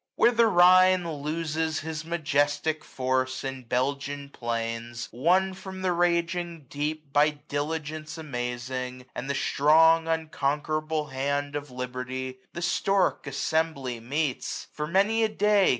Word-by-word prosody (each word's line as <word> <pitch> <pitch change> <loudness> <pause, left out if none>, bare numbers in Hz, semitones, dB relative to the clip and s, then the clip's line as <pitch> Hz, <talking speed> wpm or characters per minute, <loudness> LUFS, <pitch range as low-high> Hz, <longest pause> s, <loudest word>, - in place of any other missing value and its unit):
Where 240 - +5
the 235 -1 +4
Rhine 185 -1 +6
loses 160 +1 -1
his 160 0 -5
majestic 155 -1 0
force 130 0 -1
In 135 -1 -4
Belgian 140 +3 -2
plains, 115 -1 -4
won 180 - +2
from 190 0 -8
the 185 - +2
raging 170 -1 0
deep. 150 0 -3
By 150 +1 +5
diligence 155 +1 -4
amazing, 125 -2 -4
and 135 - -5
the 140 - 0
strong 160 +4 +4
Unconquerable 155 -1 -1
hand 140 +2 -2
of 145 -1 -4
Liberty, 125 +1 -4
850 130 0 -15
The 170 - -5
stork 175 -6 +1
assembly 140 -3 -1
meets 140 +4 -2
j - - -28
for 150 0 -3
many 200 +6 +3
a 220 - +2
day. 210 -2 +3
150 Hz, 135 wpm, -27 LUFS, 130-165 Hz, -, Rhine